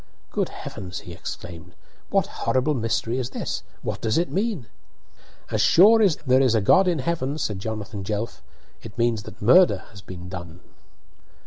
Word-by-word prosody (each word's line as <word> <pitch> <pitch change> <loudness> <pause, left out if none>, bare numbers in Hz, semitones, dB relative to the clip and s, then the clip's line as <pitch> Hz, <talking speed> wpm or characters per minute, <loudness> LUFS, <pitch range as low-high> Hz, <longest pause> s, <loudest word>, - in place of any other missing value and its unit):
"Good - - -1
heavens!" 90 -2 -7
he 90 - -10
exclaimed, 90 0 -8 0.3
"what - - +2
horrible 130 +4 0
mystery 115 0 -1
is 125 -1 -3
this? - - -4 0.2
What - - -4
does 110 -1 +1
it 175 +2 0
mean?" 195 - -1 0.9
"As - - +1
sure 220 +6 +6
as 190 -7 +4
there 130 0 +4
is 125 -4 +3
a - - +4
God 185 - +5
in 175 -2 +2
heaven," 145 -1 -2
said 105 -9 -2
Jonathan 105 -1 -5
Jelf, 105 +3 -4 0.4
"it 115 0 -11
means 115 -2 +1
that 105 - -11
murder 130 - +5
has 100 - -12
been 90 -2 -9
done." 90 -2 -8
115 Hz, 165 wpm, -24 LUFS, 95-150 Hz, 0.9 s, sure